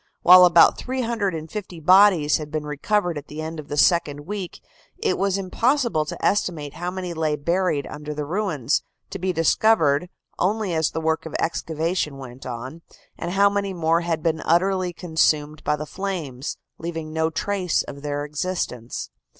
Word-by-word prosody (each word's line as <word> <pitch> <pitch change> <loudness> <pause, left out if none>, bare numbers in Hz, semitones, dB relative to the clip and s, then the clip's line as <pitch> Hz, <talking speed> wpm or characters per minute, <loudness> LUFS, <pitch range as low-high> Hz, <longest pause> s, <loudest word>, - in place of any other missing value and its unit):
While 180 +1 +9
about 170 -1 +6
350 205 -8 -3
bodies 180 -3 +5
had 150 -1 -7
been 155 0 -3
recovered 170 +3 -1
at 145 - -15
the 150 - -8
end 160 0 -5
of 150 - -8
the 145 - -4
second 150 -3 +3
week, 190 +2 -6 0.4
it 455 - 0
was 195 0 0
impossible 230 - +1
to - - -5
estimate 170 -8 0
how 175 +1 -4
many 180 -1 -5
lay 160 -2 0
buried 170 -1 0
under 150 0 -7
the 150 0 -3
ruins, 160 - 0 0.3
to - - -5
be 185 +1 0
discovered 165 -2 +3 0.3
only 205 0 0
as 160 -1 +1
the 160 - -4
work 160 0 0
of 160 - -8
excavation 160 -2 -1
went 130 -1 -10
on, 130 +6 -7 0.3
and 175 - -4
how 200 +1 +5
many 200 -1 -1
more 165 0 +2
had 165 -2 -2
been 160 -1 0
utterly 185 +1 +2
consumed 155 -3 0
by 150 - +1
the 150 +1 -6
flames, 155 -8 -4 0.2
leaving 165 -2 -5
no 160 0 +1
trace 185 0 -1
of 140 - -9
their 145 0 -3
existence. 150 -6 -4
165 Hz, 165 wpm, -23 LUFS, 150-185 Hz, 0.4 s, While